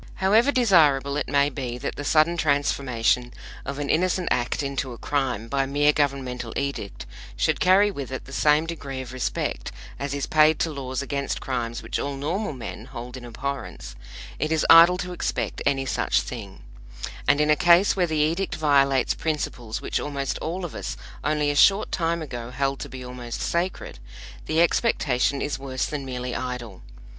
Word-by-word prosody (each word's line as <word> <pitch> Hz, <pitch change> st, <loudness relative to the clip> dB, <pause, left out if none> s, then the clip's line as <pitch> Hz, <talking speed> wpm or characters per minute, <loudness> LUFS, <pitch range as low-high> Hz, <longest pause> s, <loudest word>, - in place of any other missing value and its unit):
However 220 Hz, +8 st, +4 dB
desirable 155 Hz, -, +4 dB
it 150 Hz, -, -2 dB
may 140 Hz, 0 st, +3 dB
be 125 Hz, -3 st, -4 dB
that 135 Hz, -, -4 dB
the 145 Hz, -, -5 dB
sudden 155 Hz, +3 st, +3 dB
transformation 135 Hz, -6 st, +1 dB, 0.3 s
of 140 Hz, -, -5 dB
an 145 Hz, -1 st, -3 dB
innocent 180 Hz, +3 st, +1 dB
act 120 Hz, +4 st, 0 dB
into 135 Hz, -2 st, -3 dB
a -, -, -10 dB
crime 125 Hz, -6 st, -1 dB
by 135 Hz, +1 st, 0 dB
mere 145 Hz, +2 st, +3 dB
governmental 130 Hz, -5 st, -1 dB
edict 140 Hz, -, -4 dB, 0.3 s
should -, -, +1 dB
carry 195 Hz, +3 st, +5 dB
with 140 Hz, -8 st, -6 dB
it 130 Hz, -, -5 dB
the 135 Hz, -, -11 dB
same 150 Hz, +2 st, +3 dB
degree 140 Hz, -5 st, -5 dB
of 130 Hz, -1 st, -9 dB
respect 130 Hz, -, -3 dB, 0.3 s
as 140 Hz, 0 st, -3 dB
is 140 Hz, -, -2 dB
paid 155 Hz, 0 st, +4 dB
to 165 Hz, -, 0 dB
laws 135 Hz, -2 st, -4 dB
against 140 Hz, 0 st, -2 dB
crimes 120 Hz, -3 st, -3 dB
which -, -, -3 dB
all 140 Hz, 0 st, -3 dB
normal 165 Hz, +8 st, -2 dB
men 120 Hz, -3 st, -7 dB
hold 125 Hz, -1 st, -8 dB
in 130 Hz, -, -9 dB
abhorrence, 135 Hz, +4 st, -6 dB, 0.4 s
it 155 Hz, +3 st, -1 dB
is 160 Hz, -1 st, +2 dB
idle 170 Hz, +2 st, +9 dB
to 180 Hz, 0 st, -4 dB
expect -, -, -3 dB
any 135 Hz, -1 st, +1 dB
such 130 Hz, -, +1 dB
thing; 105 Hz, -6 st, -8 dB, 0.6 s
and 145 Hz, -, +4 dB
in 150 Hz, 0 st, +3 dB
a -, -, +6 dB
case 175 Hz, +4 st, +5 dB
where 180 Hz, -2 st, +2 dB
the 160 Hz, -1 st, -1 dB
edict 165 Hz, +6 st, 0 dB
violates 140 Hz, -3 st, +3 dB
principles 125 Hz, -8 st, -3 dB
which -, -, -1 dB
almost 140 Hz, -2 st, -3 dB
all 175 Hz, +3 st, -3 dB
of 170 Hz, -, -7 dB
us -, -, -5 dB, 0.3 s
only 150 Hz, -1 st, +1 dB
a -, -, -3 dB
short 195 Hz, +8 st, +4 dB
time 170 Hz, -1 st, 0 dB
ago 120 Hz, -5 st, -6 dB
held 135 Hz, +2 st, -1 dB
to 145 Hz, -, -6 dB
be 130 Hz, 0 st, -8 dB
almost 125 Hz, -2 st, -6 dB
sacred, 175 Hz, +2 st, -2 dB, 0.5 s
the 160 Hz, +1 st, +2 dB
expectation 140 Hz, -, +1 dB
is 145 Hz, -2 st, -3 dB
worse 130 Hz, -1 st, -2 dB
than 150 Hz, -2 st, -4 dB
merely 125 Hz, -1 st, -4 dB
idle. 125 Hz, -6 st, -5 dB
140 Hz, 180 wpm, -25 LUFS, 130-160 Hz, 0.6 s, idle